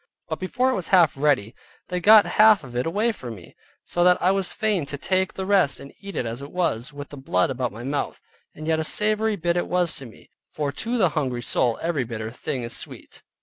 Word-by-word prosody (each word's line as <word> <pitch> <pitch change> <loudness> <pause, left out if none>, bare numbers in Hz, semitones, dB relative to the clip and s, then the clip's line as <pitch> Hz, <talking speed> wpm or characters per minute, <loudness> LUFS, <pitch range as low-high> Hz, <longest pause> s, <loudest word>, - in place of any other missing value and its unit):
But - - -3
before 250 +8 0
it - - 0
was 185 -8 -1
half 175 -5 +4
ready 135 -6 +1 0.4
they 180 - -1
got 210 +3 +7
half 215 -4 +5
of 125 -2 -11
it 125 +4 -1
away 210 +8 +1
from 120 - -8
me, 90 -4 -15 0.3
so 175 - 0
that 180 0 +5
I 185 - +3
was 195 -2 -1
fain 215 -7 0
to 145 - -5
take 185 +5 0
the 190 - -4
rest 190 -8 +3
and 140 - -11
eat 200 -1 -8
it - - -1
as 115 +3 -5
it 140 - -9
was, 150 -7 -1
with 145 -1 -9
the 145 - -10
blood 165 +2 0
about 125 -2 -2
my 115 +3 -9
mouth, 140 +3 -3 0.4
and 155 - -8
yet 160 -1 +2
a - - 0
savory 215 +5 +2
bit 170 -2 -1
it 175 - -1
was 180 -2 +1
to 135 -4 -7
me: 110 - -18 0.2
"For 145 -2 -3
to 230 +11 -3
the 190 -6 +4
hungry 130 -6 -2
soul 120 0 +1
every 165 -5 0
bitter 110 -2 -5
thing 125 +1 -4
is 115 0 -5
sweet." - - -9
160 Hz, 240 wpm, -24 LUFS, 130-190 Hz, 0.4 s, got